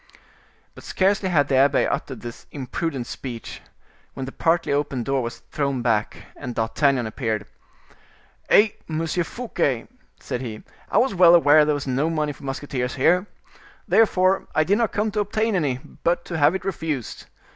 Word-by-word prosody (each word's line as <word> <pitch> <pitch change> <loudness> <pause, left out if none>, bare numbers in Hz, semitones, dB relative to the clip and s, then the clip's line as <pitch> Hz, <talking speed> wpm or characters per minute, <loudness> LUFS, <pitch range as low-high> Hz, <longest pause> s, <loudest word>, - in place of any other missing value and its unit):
But - - -13
scarcely 190 0 +1
had 145 -5 +3
the 135 - +2
abbe 140 +1 +4
uttered 140 -3 -3
this 120 -1 -9
imprudent 135 0 -4
speech, 120 -1 -7 0.5
when 135 - -4
the 135 - -7
partly 165 0 +1
open 140 -3 -1
door 135 +2 0
was 120 0 -6
thrown 140 -4 -1
back, 110 -2 -1
and 125 -4 -7
D'Artagnan 120 +3 +1
appeared. 110 -1 -3 1.0
"Eh! 215 +2 +6 0.2
Monsieur 165 +2 -1
Fouquet," 165 - -2 0.3
said 125 - -4
he, 110 -4 -6 0.3
"I - - +1
was 260 -2 +3
well 175 -2 +7
aware 150 -2 +6
there 150 0 +1
was 145 - -4
no 135 +4 0
money 155 -2 -1
for - - -17
musketeers 135 -2 -3
here. 180 +8 +3 0.6
Therefore 190 -4 +3
I 155 - +4
did 200 +7 +2
not 230 - +1
come 210 +1 -1
to 210 - -2
obtain 215 +2 0
any, 145 -9 0 0.2
but 170 +1 0
to 175 - -4
have 145 +5 +4
it 190 - -5
refused. 160 - -4
145 Hz, 170 wpm, -23 LUFS, 130-180 Hz, 1.0 s, well